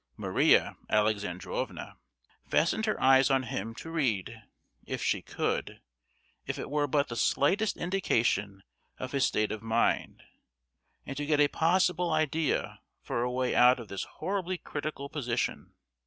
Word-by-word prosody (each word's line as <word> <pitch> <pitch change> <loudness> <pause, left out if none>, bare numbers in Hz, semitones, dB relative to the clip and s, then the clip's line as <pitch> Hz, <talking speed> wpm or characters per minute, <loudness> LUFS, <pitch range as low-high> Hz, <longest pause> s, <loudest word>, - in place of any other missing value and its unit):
Maria - - +3
Alexandrovna 105 -4 -1 0.5
fastened 220 +7 +1
her 215 - 0
eyes 135 +1 +5
on 135 -1 +2
him, 115 -1 -4
to 165 - -8
read—if 115 - -4
she - - +1
could—if - - -6
it - - -6
were 145 0 +1
but 145 +1 +1
the 120 - -6
slightest 195 - +1
indication 115 - 0 0.3
of 130 - -6
his 140 -2 +2
state 105 0 0
of 110 - -4
mind, 115 +1 0 0.8
and 135 - -6
to 145 - -2
get 150 -1 +2
a 145 - +6
possible 175 +2 +2
idea 155 0 0 0.2
for - - -2
a 125 - 0
way 125 0 -1
out 125 +1 +6
of 115 - -9
this 100 - -4
horribly 185 +1 -2
critical 145 -3 -5
position. 125 -5 -3
135 Hz, 140 wpm, -29 LUFS, 115-160 Hz, 0.8 s, a